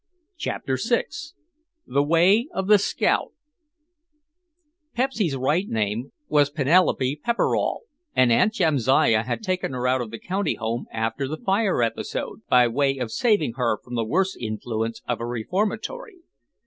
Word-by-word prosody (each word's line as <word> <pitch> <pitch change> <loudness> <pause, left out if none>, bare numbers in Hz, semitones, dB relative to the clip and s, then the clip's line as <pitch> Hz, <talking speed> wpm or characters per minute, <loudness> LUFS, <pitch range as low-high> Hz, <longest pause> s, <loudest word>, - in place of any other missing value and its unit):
CHAPTER - - -3
VI - - +2 0.8
THE 140 +2 +1
WAY 180 - +3
OF 190 - -1
THE 210 +1 +6
SCOUT 200 - 0 1.6
Pepsy's 230 - 0
right 150 +9 0
name 110 +4 -2 0.2
was 145 -1 +3
Penelope 145 -2 +2
Pepperall 235 0 0 0.3
and 125 -2 +4
Aunt 160 - +4
Jamsiah 135 - +3
had 125 - -3
taken 185 -8 -2
her 125 0 -1
out 130 0 +2
of 120 - -5
the 115 - -7
County 190 - -2
Home 115 +1 -3
after 115 +4 -2
the 155 +3 -4
fire 195 - +1
episode, 115 - -3
by 125 -1 +5
way 135 +3 +1
of 125 -4 -4
saving 165 - +1
her 120 -4 +1
from 125 - -13
the 115 -1 0
worse 185 - 0
influence 115 0 -4
of 120 -2 -2
a - - -2
reformatory. 210 - -3
135 Hz, 145 wpm, -24 LUFS, 120-190 Hz, 1.6 s, THE